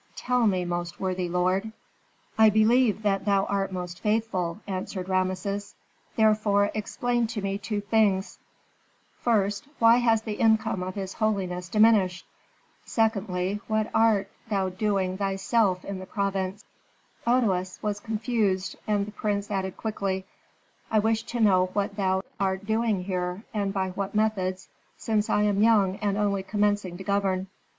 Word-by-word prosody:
Tell 250 -2 +1
me, 185 -3 +1
most 175 0 -4
worthy 185 -2 -2
lord." 185 +4 0 0.6
"I 220 0 +6
believe 220 +1 +3
that 195 -2 +1
thou 200 -1 +2
art 195 -1 -1
most 180 -1 -5
faithful," 210 -5 -1
answered 185 -1 -4
Rameses. 185 +2 -2 0.4
"Therefore 215 -2 +3
explain 240 +2 -1
to 220 -2 -4
me 195 0 -2
two 210 -1 -3
things: 205 -2 +1 0.8
first, 205 -1 0
why 230 +1 +6
has 225 -2 +2
the 215 -2 -5
income 220 -4 +2
of 185 0 -4
his 190 -2 -4
holiness 185 -5 -1
diminished? 210 -4 +3 0.6
second, 200 -3 0
what 215 0 0
art 210 -3 +3 0.2
thou 195 -3 0
doing 190 -1 -1
thyself 195 -1 +1
in 200 -1 -5
the 185 - -9
province?" 195 0 -2 0.6
Otoes 195 -7 +1
was 205 -1 -1
confused, 215 -4 -1
and 205 -2 +1
the 210 - -8
prince 205 -1 -2
added 190 -2 -2
quickly, 195 -3 -2 0.6
"I 220 - +2
wish 220 +1 +2
to 240 - -4
know 185 -4 +4
what 200 -1 -1
thou 190 -1 0 0.2
art 190 0 -1
doing 220 -3 0
here, 180 +1 -3
and 200 -2 -1
by 190 -1 -1
what 195 +2 -4
methods, 190 -4 0 0.3
since 220 0 0
I 210 - +2
am 205 -1 +2
young 205 -4 +4
and 205 -1 -1
only 200 -2 +1
commencing 205 -2 0
to 190 - -8
govern." 195 -1 0
200 Hz, 145 wpm, -26 LUFS, 190-215 Hz, 0.8 s, I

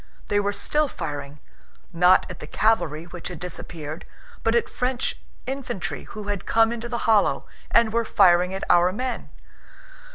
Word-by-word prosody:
They 205 - +3
were 205 0 +1
still 300 +9 +1
firing, 145 - -6 0.5
not 180 +2 +5
at 180 - -8
the 150 - -8
cavalry 165 -7 +1
which 175 0 -8
had 175 -3 -7
disappeared, 165 -3 -6 0.4
but 225 +1 +1
at 235 - +2
French 250 0 -2 0.2
infantry 265 -8 -4
who 215 - -8
had 205 -2 -4
come 225 0 +4
into 235 0 -5
the 235 - -3
hollow 220 -3 +3 0.2
and 220 -2 +4
were 235 0 +2
firing 180 -4 +4
at 190 0 -4
our 175 +1 +5
men. 250 +5 -4
200 Hz, 160 wpm, -24 LUFS, 175-230 Hz, 0.5 s, not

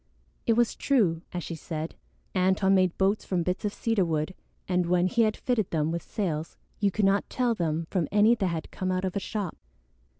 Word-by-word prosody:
It 230 - +5
was 235 0 +2
true, 195 -13 +2
as 175 -1 -4
she - - -5
said. 160 0 -5 0.4
Antone 190 +1 +3
made 185 -2 +3
boats 195 +2 +2
from 180 -3 -1
bits 180 +4 -2
of 205 - 0
cedar 225 -2 +1
wood, 160 +1 -1 0.3
and 180 -1 +1
when 175 0 +3
he 235 +5 +2
had 215 -1 +2
fitted 235 -6 0
them 155 -1 0
with 170 0 -2
sails 165 -7 -3 0.2
you 205 - +3
could 205 +1 +1
not 195 +1 +2
tell 245 -2 +1
them 165 -4 -1
from 175 -6 +1
any 210 +3 +5
that 205 -5 0
had 165 -3 -4
come 185 0 -2
out 185 +1 0
of 185 - -3
a - - +1
shop. 200 -3 -4
185 Hz, 210 wpm, -27 LUFS, 170-210 Hz, 0.4 s, It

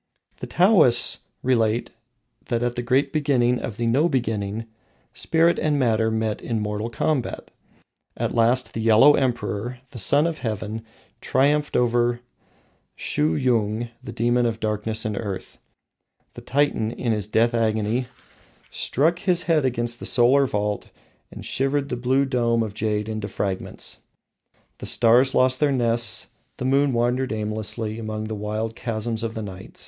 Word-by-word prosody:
The - - -7
Taoists 175 - +4 0.2
relate 115 -2 +1 0.5
that 120 -1 -1
at 120 0 0
the 120 - -2
great 130 +3 +1
beginning 130 -5 +2
of 105 - -6
the 120 - -1
No 135 +9 +3
Beginning, 110 -5 -2 0.5
Spirit 165 +1 +2
and 150 -2 +1
Matter 115 -4 +2
met 110 -1 -2
in 115 -2 -2
mortal 105 +2 -3
combat. 130 +3 -2 0.7
At - - -2
last 120 +2 +2
the 110 - -3
Yellow 115 +6 +6
Emperor, 125 -3 -1
the 125 - -8
Sun 145 +10 +4
of 165 -2 -2
Heaven, 110 -1 -4 0.4
triumphed 145 +2 +1
over 120 0 +2 0.8
Shuhyung, 110 +7 0
the - - -8
demon 120 +1 +1
of 115 -1 -3
darkness 110 +1 -1
and 110 -1 -2
earth. 100 -3 -6 0.7
The - - -10
Titan, 140 -5 0
in 120 0 -2
his 105 -2 -1
death 115 +3 +2
agony, 110 +2 0 0.6
struck 165 +6 0
his 180 -2 +1
head 160 -5 +2
against 120 -1 -1
the - - -3
solar 130 +3 +4
vault 105 -2 -2 0.4
and - - -9
shivered 135 +1 -1
the - - -2
blue 130 +3 +1
dome 120 -3 +1
of 105 -2 -5
jade 105 0 -1
into 110 -2 -4
fragments. 95 -1 -4 0.8
The - - -6
stars 120 +3 +4
lost 130 0 +3
their 150 -2 +3
nests, 120 -2 +1 0.3
the 125 - -4
moon 140 +2 +3
wandered 125 +2 0
aimlessly 110 +1 -3
among 110 -1 -4
the 110 0 -5
wild 110 +2 -3
chasms 115 -1 -3
of 115 -1 -4
the 110 - -4
night. 95 -2 -9
120 Hz, 150 wpm, -23 LUFS, 110-130 Hz, 0.8 s, Yellow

